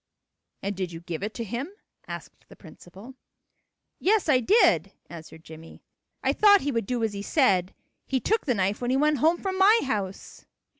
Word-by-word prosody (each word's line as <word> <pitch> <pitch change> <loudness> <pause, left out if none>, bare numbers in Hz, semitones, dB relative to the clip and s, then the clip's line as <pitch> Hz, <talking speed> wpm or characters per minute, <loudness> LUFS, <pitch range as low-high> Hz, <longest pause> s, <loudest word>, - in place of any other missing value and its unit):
"And 200 +1 -3
did 185 -2 -4
you 165 0 -9
give 170 -1 -6
it 210 +2 -5
to 235 - -4
him?" 240 - -5 0.4
asked - - -10
the - - -14
principal. 195 +9 -14 0.9
"Yes, 415 0 +1
I 270 -4 +4
did," 410 - +3 0.2
answered 160 -1 -11
Jimmie. 160 0 -13 0.4
"I - - +2
thought 405 -2 +5
he 285 - -2
would 230 -5 -2
do 245 -2 -2
as 220 -2 -1
he 200 - -5
said. 195 - +1 0.3
He 265 - 0
took 435 - -1
the 250 - +1
knife 200 +3 -1
when 245 - -2
he 260 - +2
went 300 0 +2
home 325 +6 +3
from 380 0 -4
my 425 +4 +5
house." 200 -7 -5
235 Hz, 190 wpm, -25 LUFS, 190-305 Hz, 0.9 s, thought